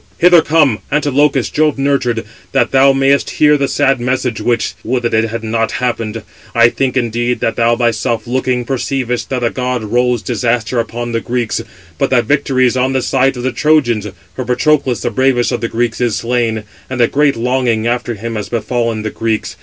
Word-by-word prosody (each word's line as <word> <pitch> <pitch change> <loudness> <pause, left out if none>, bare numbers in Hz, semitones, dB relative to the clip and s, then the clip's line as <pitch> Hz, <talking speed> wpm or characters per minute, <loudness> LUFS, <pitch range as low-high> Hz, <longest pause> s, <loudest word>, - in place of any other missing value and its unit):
hither 175 -1 +6
come, 150 -8 +2
Antilochus, 145 -2 +1
Jove 155 -1 +1
nurtured, 130 -5 0 0.3
that 135 - +2
thou 135 +1 +5
mayest 135 +1 +2
hear 150 0 +3
the 140 -1 0
sad 135 -1 +1
message 125 -1 -1
which—would 120 +1 -1
that 120 - -1
it 110 0 +2
had 115 +1 -5
not 115 0 -1
happened. 115 -3 -2 0.3
I 120 0 +6
think, 130 +1 -1
indeed, 120 0 -1
that 115 - 0
thou 120 0 +2
thyself 115 -1 -1
looking, 125 0 -1
perceivest 130 -1 -2
that 125 -2 -2
a 115 - +1
god 125 -2 -2
rolls 120 +2 0
disaster 120 0 -1
upon 120 +1 -3
the 115 0 -1
Greeks, 120 -1 -2 0.4
but - - +1
that 120 -3 +2
victory 135 -1 +1
is 125 - +1
on 130 +1 +1
the 130 -2 0
side 135 0 +1
of 120 - -5
the 130 - 0
Trojans; 120 -9 +1 0.3
for 130 - -3
Patroclus, 125 +1 +1
the 120 - -2
bravest 130 +1 +1
of 120 -3 -2
the 115 - -2
Greeks, 120 0 -2
is 120 -4 +1
slain; 115 -2 -1 0.3
and 130 -1 -4
a 120 - +6
great 145 +1 +2
longing 120 -2 0
[after 120 0 -1
him] 115 +3 -5
has 105 - -5
befallen 115 -1 -2
the 110 - -3
Greeks. 115 -1 -2
120 Hz, 195 wpm, -15 LUFS, 115-135 Hz, 0.4 s, hither